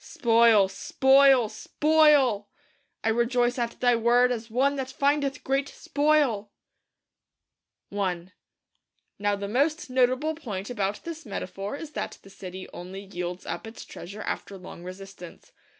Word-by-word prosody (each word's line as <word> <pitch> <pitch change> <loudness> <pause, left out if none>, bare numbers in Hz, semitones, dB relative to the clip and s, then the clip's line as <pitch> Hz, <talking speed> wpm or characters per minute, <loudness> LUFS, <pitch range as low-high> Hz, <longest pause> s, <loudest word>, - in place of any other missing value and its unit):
Spoil; 230 -4 +4
spoil; 265 +4 +4
SPOIL! 275 -2 +3 0.5
'I 225 - +2
rejoice 240 +2 +1
at 235 -1 -3
Thy 245 -1 +4
Word 240 +2 +3
as 230 -1 -4
one 270 +5 +2
that 265 -1 -3
findeth 280 +1 0
great 275 +1 0
spoil!' 290 -9 +1 1.5
I 185 -3 -2 0.9
Now 205 0 +1
the 200 0 -5
most 290 +6 0
notable 255 +4 +2
point 215 -9 -6
about 205 -3 -2
this 330 -1 -7
metaphor 195 +1 -5
is 300 +1 -8
that - - -5
the 195 - -15
city 185 -1 -8
only 185 +2 -8
yields 180 -2 -6
up - - -5
its 225 - -10
treasure 200 +5 -9
after 200 - -5
long 180 -1 -11
resistance. 185 -1 -11
235 Hz, 135 wpm, -26 LUFS, 200-275 Hz, 1.5 s, Spoil